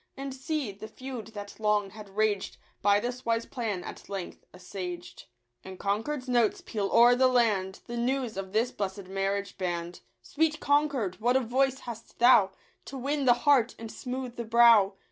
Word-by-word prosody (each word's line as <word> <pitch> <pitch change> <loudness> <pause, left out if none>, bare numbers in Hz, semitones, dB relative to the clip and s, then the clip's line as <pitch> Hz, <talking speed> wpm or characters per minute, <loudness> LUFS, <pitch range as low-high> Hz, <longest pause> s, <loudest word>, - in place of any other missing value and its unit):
And, 275 0 -5
see, 270 -2 -3
the 205 +2 -10
feud 250 -1 -8
that 205 +1 -8
long 210 -2 +1
had 210 -1 -11
raged 215 -2 0 0.2
By 205 0 +4
this 245 +3 -4
wise 230 0 0
plan 215 -7 -3
at - - -10
length 195 -3 -6
assuaged; 180 -1 -7 0.4
And 190 0 -9
Concord's 240 +9 -2
notes 240 -3 +2
peal 205 -3 -2
o'er 240 +1 +7
the 260 +1 +4
land 210 -7 +1
The 240 - -6
news 250 -1 -1
of 190 -1 -5
this 225 +4 +1
bless'd 195 -1 -4
marriage 195 0 -2
band. 175 -1 -3 0.2
Sweet 310 - 0
Concord, 280 -10 +1
what 245 +3 +3
a - - +3
voice 265 +2 0
hast 230 -2 -9
thou 235 -5 +6 0.4
To 275 - -7
win 280 +2 -1
the 245 -2 +6
heart 265 -5 +4
and 225 -1 -8
smooth 250 -1 -6
the 235 - -3
brow 225 -4 +5
230 Hz, 175 wpm, -28 LUFS, 200-255 Hz, 0.4 s, o'er